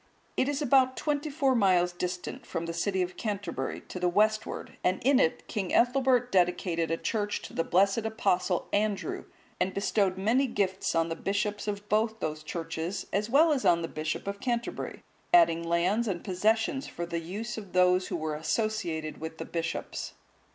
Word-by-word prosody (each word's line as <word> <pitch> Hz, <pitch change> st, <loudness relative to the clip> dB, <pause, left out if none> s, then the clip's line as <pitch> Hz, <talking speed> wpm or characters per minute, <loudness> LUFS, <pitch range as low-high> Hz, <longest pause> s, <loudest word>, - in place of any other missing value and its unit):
It 265 Hz, -, +1 dB
is 290 Hz, +1 st, -1 dB
about 260 Hz, -1 st, +4 dB
twenty 295 Hz, 0 st, -1 dB
four 275 Hz, -2 st, +2 dB
miles 185 Hz, -6 st, +3 dB
distant 180 Hz, 0 st, -4 dB
from 165 Hz, -1 st, -4 dB
the 170 Hz, -, -4 dB
city 185 Hz, +2 st, 0 dB
of 180 Hz, 0 st, -6 dB
Canterbury 195 Hz, -, -3 dB
to 180 Hz, -, -5 dB
the 180 Hz, 0 st, +2 dB
westward, 215 Hz, +3 st, 0 dB
and 185 Hz, -, +2 dB
in 270 Hz, +1 st, +5 dB
it 160 Hz, -, +1 dB
King 200 Hz, -5 st, -3 dB
Ethelbert 250 Hz, 0 st, +3 dB
dedicated 175 Hz, -2 st, +1 dB
a 165 Hz, -, 0 dB
church 210 Hz, +1 st, -2 dB
to -, -, -9 dB
the 165 Hz, -, 0 dB
blessed 195 Hz, +5 st, +3 dB
Apostle 200 Hz, -5 st, 0 dB
Andrew,(177) 205 Hz, -1 st, -1 dB, 0.3 s
and 190 Hz, -, 0 dB
bestowed 200 Hz, -2 st, +1 dB
many 235 Hz, +8 st, +2 dB
gifts 195 Hz, -5 st, -1 dB
on 165 Hz, 0 st, +2 dB
the 165 Hz, -, -2 dB
bishops 205 Hz, +3 st, -2 dB
of 205 Hz, 0 st, -3 dB
both 220 Hz, +2 st, +1 dB
those 155 Hz, 0 st, -3 dB
churches, 165 Hz, +3 st, -4 dB
as 210 Hz, +3 st, 0 dB
well 305 Hz, +5 st, +5 dB
as 265 Hz, -, -1 dB
on 170 Hz, -1 st, +4 dB
the -, -, -2 dB
Bishop 155 Hz, 0 st, -3 dB
of 200 Hz, 0 st, -4 dB
Canterbury, 240 Hz, -1 st, -3 dB, 0.3 s
adding 335 Hz, -, +5 dB
lands 175 Hz, +7 st, +1 dB
and 180 Hz, -4 st, -2 dB
possessions 220 Hz, +7 st, +1 dB
for 170 Hz, -, -5 dB
the 170 Hz, 0 st, -3 dB
use 200 Hz, +8 st, -5 dB
of 200 Hz, -4 st, -12 dB
those 180 Hz, 0 st, +4 dB
who -, -, -3 dB
were 155 Hz, -2 st, -2 dB
associated 160 Hz, -1 st, -2 dB
with 160 Hz, 0 st, -6 dB
the -, -, -5 dB
bishops. 165 Hz, -1 st, -4 dB
195 Hz, 180 wpm, -29 LUFS, 170-225 Hz, 0.3 s, in